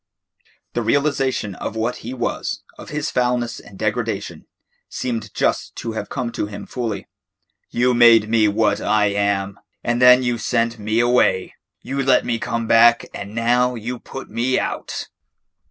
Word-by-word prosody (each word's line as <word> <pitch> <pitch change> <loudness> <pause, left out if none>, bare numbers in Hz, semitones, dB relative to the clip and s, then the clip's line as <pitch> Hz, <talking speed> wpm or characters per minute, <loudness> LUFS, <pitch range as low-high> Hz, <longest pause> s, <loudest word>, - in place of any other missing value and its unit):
The - - -1
realisation 135 -7 0
of 105 - -6
what 115 +2 -1
he 120 - -7
was, 130 - -3
of - - -11
his 150 0 -3
foulness 125 -1 0
and 100 - -14
degradation, - - -3 0.4
seemed 120 -3 -4
just - - 0
to 115 - -4
have 110 -2 -5
come 120 - -3
to 105 - -3
him 100 -1 -8
fully. 110 -6 -4 0.6
"You 125 +1 +2
made 115 -3 +6
me 110 -1 +3
what 105 +1 +1
I 105 -1 +2
am, 100 -1 -1 0.2
and 120 +1 0
then 125 +1 +7
you 120 -1 0
sent 115 -1 0
me 110 +2 0
away. 120 -6 +2 0.3
You 135 +1 -2
let 135 -1 +3
me 115 -2 -1
come 115 0 -2
back, 120 +1 +5
and 100 +1 -7
now 125 +2 +2
you 120 +2 -5
put 135 - -9
me 120 +4 0
out." - - -3
115 Hz, 160 wpm, -21 LUFS, 110-125 Hz, 0.6 s, then